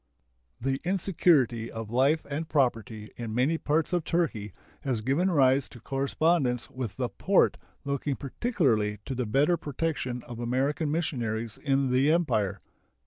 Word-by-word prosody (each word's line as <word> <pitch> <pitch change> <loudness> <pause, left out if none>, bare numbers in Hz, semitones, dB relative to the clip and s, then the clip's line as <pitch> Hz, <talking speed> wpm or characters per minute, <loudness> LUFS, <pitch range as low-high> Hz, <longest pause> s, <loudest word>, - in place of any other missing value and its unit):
The 135 +2 -1
insecurity 165 - +2
of 115 -1 -7
life 140 +6 +2
and 150 +3 -4
property 115 -6 0
in 115 -2 -5
many 145 +7 +2
parts 155 +4 0
of 175 -2 +1
Turkey 140 - -1 0.3
has 125 -5 -1
given 140 - +1
rise 135 -4 +3
to 120 - -12
correspondence 135 0 0
with 120 -7 -5
the 125 +1 -1
Porte 180 - +2 0.3
looking 140 0 -1
particularly 135 - 0
to - - -3
the 125 -2 -2
better 145 +10 +3
protection 145 -5 -3
of 120 -1 -9
American 135 +6 0
missionaries 120 -9 -2
in 135 -2 +1
the 130 +3 +3
Empire. 105 - +1
135 Hz, 140 wpm, -28 LUFS, 120-155 Hz, 0.3 s, rise